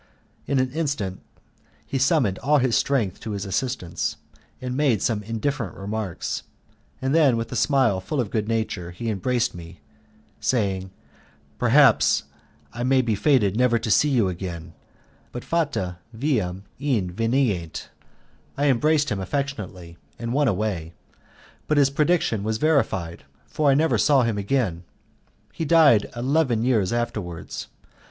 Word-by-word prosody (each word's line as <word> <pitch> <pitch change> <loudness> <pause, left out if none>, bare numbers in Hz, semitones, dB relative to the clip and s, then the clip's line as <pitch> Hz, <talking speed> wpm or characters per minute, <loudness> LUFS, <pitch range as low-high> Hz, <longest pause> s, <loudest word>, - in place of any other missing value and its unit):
In 140 - +1
an 130 -1 +1
instant 135 - -2 0.6
he 135 - -2
summoned 130 - +2
all 150 +4 +3
his 130 -3 +2
strength 120 -10 0
to 110 -2 -5
his 100 0 -4
assistance, 100 -3 -2 0.4
made 130 -2 +1
some 110 -3 0
indifferent 115 - -3
remarks, 100 -1 -4 0.6
and 135 +1 +1
then, 145 -7 +4
with 115 0 -4
a - - -4
smile 125 -6 +2
full 120 +10 -3
of 115 -5 -1
good 105 -2 -1
nature, 110 -6 -2
he 110 +6 -4
embraced 115 +4 0
me, 85 0 -11 0.6
saying, 95 -6 0 0.7
"Perhaps 125 0 +5 0.5
I 120 - -6
may 130 +1 +3
be 115 -2 0
fated 105 -4 +2
never 120 0 +3
to 115 -1 -2
see 150 - +4
you 120 -8 +2
again, 85 -2 -6 0.6
but 125 - -6
'Fata 135 - -1 0.2
viam 105 -9 -1 0.2
invenient'." 115 - -1 0.7
I 145 +1 +2
embraced 150 +4 +2
him 100 - -1
affectionately, 95 -7 -4 0.2
and 115 0 -4
went 145 -1 +3
away, 95 -5 -2 0.7
but 150 - +1
his 140 -1 +4
prediction 150 - +1
was 110 +1 -1
verified, 100 - 0 0.2
for 150 -2 0
I 135 - +5
never 160 +3 +2
saw 140 -3 +4
him 115 -3 -1
again; 100 -6 -1 0.7
he - - -4
died 150 -9 +5
eleven 130 -2 +1
years 115 -7 +2
afterwards. 105 -8 -4
115 Hz, 140 wpm, -24 LUFS, 95-140 Hz, 0.7 s, Perhaps